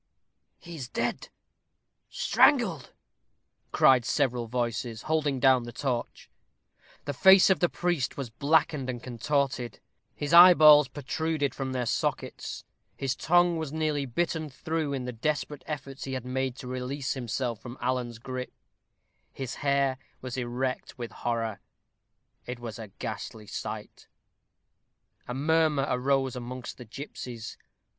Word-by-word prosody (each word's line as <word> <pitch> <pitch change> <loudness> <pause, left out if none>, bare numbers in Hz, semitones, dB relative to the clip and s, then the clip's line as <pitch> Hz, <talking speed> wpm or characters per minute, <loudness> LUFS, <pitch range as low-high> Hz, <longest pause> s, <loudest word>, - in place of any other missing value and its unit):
"He 170 -1 -10
is 130 -5 -5
dead - - -2 0.8
strangled," 205 - +3 0.8
cried 130 -2 +5
several 125 -3 0
voices, 115 -1 -2
holding 150 -4 0
down 130 -1 +5
the 120 0 -7
torch. 125 -2 -3 0.8
The 145 - -2
face 190 +7 +7
of 190 - +3
the 175 - +3
priest 175 -6 -1
was 135 -5 -5
blackened 150 +1 +1
and 120 -1 -4
contorted; 125 -2 -1 0.4
his 145 +2 -3
eyeballs 155 -5 +9
protruded 145 +2 -2
from 135 -1 -4
their 125 -1 -1
sockets; - - -3 0.3
his 135 -2 -1
tongue 175 0 +3
was 160 -3 -4
nearly 155 -3 -1
bitten 160 +4 -1
through 155 +2 -3
in 135 -3 -3
the 125 - -3
desperate 145 +3 -2
efforts 140 -2 -6
he 135 - -4
had 130 -2 -4
made 130 0 -2
to 130 - -9
release 130 +2 -3
himself 120 -2 -3
from 120 +1 -9
Alan's 125 -2 -2
gripe; 125 +2 -6 0.8
his 130 -3 -5
hair 140 -2 +1 0.2
was 130 -2 -6
erect 125 +1 -3
with 120 -3 -6
horror. 115 -3 -2 0.9
It 125 0 -5
was 120 -1 -7
a 110 - -7
ghastly 105 +2 -7
sight. - - -7 1.2
A 125 - -4
murmur 155 0 +2
arose 135 0 +1
amongst 125 +1 -7
the 125 - -9
gipsies. 120 -2 -7
130 Hz, 135 wpm, -28 LUFS, 125-150 Hz, 1.2 s, eyeballs